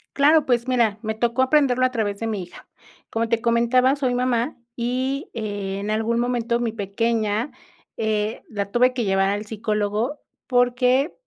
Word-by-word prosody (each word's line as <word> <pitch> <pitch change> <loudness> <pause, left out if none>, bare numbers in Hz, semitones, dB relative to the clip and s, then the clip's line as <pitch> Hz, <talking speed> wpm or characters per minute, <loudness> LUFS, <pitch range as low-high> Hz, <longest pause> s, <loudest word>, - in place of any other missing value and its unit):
Claro, 300 +2 +5
pues 245 -1 +1
mira, 230 -5 +2
me 220 -1 -2
tocó 240 +3 +1
aprenderlo 260 -3 +3
a 255 - +1
través 205 -4 -2
de 225 - -2
mi 205 -4 -2
hija. 175 - -14 0.4
Como 225 0 -1
te 230 -1 +1
comentaba, 245 +3 +3
soy 260 -3 0
mamá, 250 +1 0 0.2
y, 255 +3 -2
eh, 205 -3 -4
en 210 +1 -3
algún 225 +2 0
momento 240 -1 0
mi 235 -2 -1
pequeña, 220 +3 -1 0.5
eh, 215 0 -1
la 200 -2 -4
tuve 250 +1 +3
que 245 -2 -1
llevar 195 0 +2
al 205 +1 -2
psicólogo 215 +4 -2 0.3
porque, 250 +3 +2
235 Hz, 165 wpm, -23 LUFS, 215-250 Hz, 0.5 s, Claro